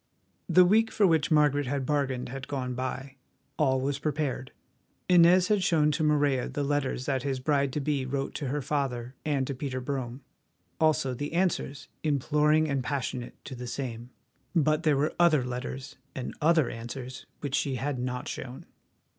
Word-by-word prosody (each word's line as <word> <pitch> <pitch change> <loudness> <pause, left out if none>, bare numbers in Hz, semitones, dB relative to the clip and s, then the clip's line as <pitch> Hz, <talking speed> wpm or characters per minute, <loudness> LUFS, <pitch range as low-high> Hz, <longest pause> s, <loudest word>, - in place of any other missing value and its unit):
The 180 0 +7
week 220 +4 +4
for 210 - +2
which 160 -4 +3
Margaret 145 -3 +3
had 135 0 -1
bargained 135 -4 -1
had 135 +1 -6
gone 130 -3 -3
by. 135 +2 -5 0.4
All 130 -3 +3
was 140 +1 -1
prepared. 145 -3 -2 0.6
Inez 180 +1 +6
had 210 -2 +3
shown 155 -4 +3
to 155 +2 -1
Morella 145 -4 +2
the 145 - -2
letters 140 -3 -1
that 135 -2 0
his 135 -1 -2
bride 140 0 +1
to - - -1
be 145 -1 0
wrote 135 +1 -2
to 145 - -4
her 145 +2 -2
father 130 -4 -2
and 140 -3 0
to 140 - -3
Peter 130 -1 -4
Brome; 130 -1 -4 0.6
also 155 -4 +2
the 145 +5 -5
answers, 170 -5 -1
imploring 150 +1 +2
and 140 -3 -1
passionate, 130 -2 -3
to 135 - -7
the 125 -1 -6
same. 120 -2 -5 0.5
But 155 -1 +3
there 155 -4 +3
were 150 +3 +1
other 160 -6 +5
letters 130 +2 -5 0.2
and 130 - -4
other 160 -2 +4
answers 125 +2 -7
which 140 -2 -4
she 135 -1 +1
had 135 +1 -2
not 125 0 -3
shown. 130 0 -6
140 Hz, 170 wpm, -28 LUFS, 130-150 Hz, 0.6 s, The